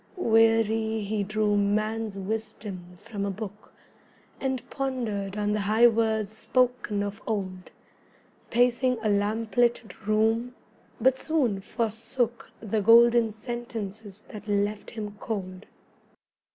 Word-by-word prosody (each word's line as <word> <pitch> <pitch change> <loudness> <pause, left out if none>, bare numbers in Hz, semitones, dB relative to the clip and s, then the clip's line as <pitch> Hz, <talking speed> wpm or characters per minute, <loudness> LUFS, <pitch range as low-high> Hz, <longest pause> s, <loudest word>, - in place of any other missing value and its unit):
Weary, 225 - +3
he 205 0 -1
drew 210 +1 +1
man's 215 +1 0
wisdom 200 -3 -5
from 205 0 -6
a 200 - -1
book, 205 +1 -7 0.7
And 260 -2 -2
pondered 225 -8 -2
on 210 0 0
the 210 - +1
high 215 +4 +4
words 220 -2 +2
spoken 245 -4 +1
of 205 +1 -5
old, 185 -4 -3 0.8
Pacing 245 +1 +3
a 215 - +2
lamplit 215 +1 0
room: 225 +3 +2 0.4
but 260 +3 +3
soon 265 -11 +1
forsook 230 +2 -2
The 215 0 -1
golden 235 +2 +6
sentences 215 -3 -6
that 210 0 -9
left 205 0 -1
him 210 -2 -6
cold. 190 -3 -5
220 Hz, 110 wpm, -27 LUFS, 205-235 Hz, 0.8 s, golden